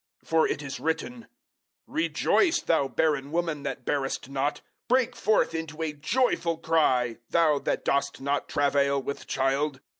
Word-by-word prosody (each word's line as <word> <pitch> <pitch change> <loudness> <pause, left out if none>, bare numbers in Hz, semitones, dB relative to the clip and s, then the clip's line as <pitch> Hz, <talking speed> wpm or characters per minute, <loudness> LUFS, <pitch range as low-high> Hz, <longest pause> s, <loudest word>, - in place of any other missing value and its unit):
004:027 - - -26
For 160 -1 +4
it - - -2
is 135 -2 -6
written, 165 - -3 0.6
"Rejoice, 335 +2 +1
thou 160 -4 +2
barren 145 +1 0
woman 165 -3 -1
that 135 -3 -5
bearest 135 -2 -2
not, 140 +2 -1 0.3
break 250 -1 +2
forth 215 -5 +2
into 160 -1 -4
a 155 -2 -2
joyful 170 - 0
cry, 130 -8 +2
thou 155 -4 +3
that - - -2
dost 140 0 0
not 140 +1 -1
travail 140 -1 +2
with 140 +1 -6
child. 135 +1 0
150 Hz, 150 wpm, -27 LUFS, 140-165 Hz, 0.6 s, For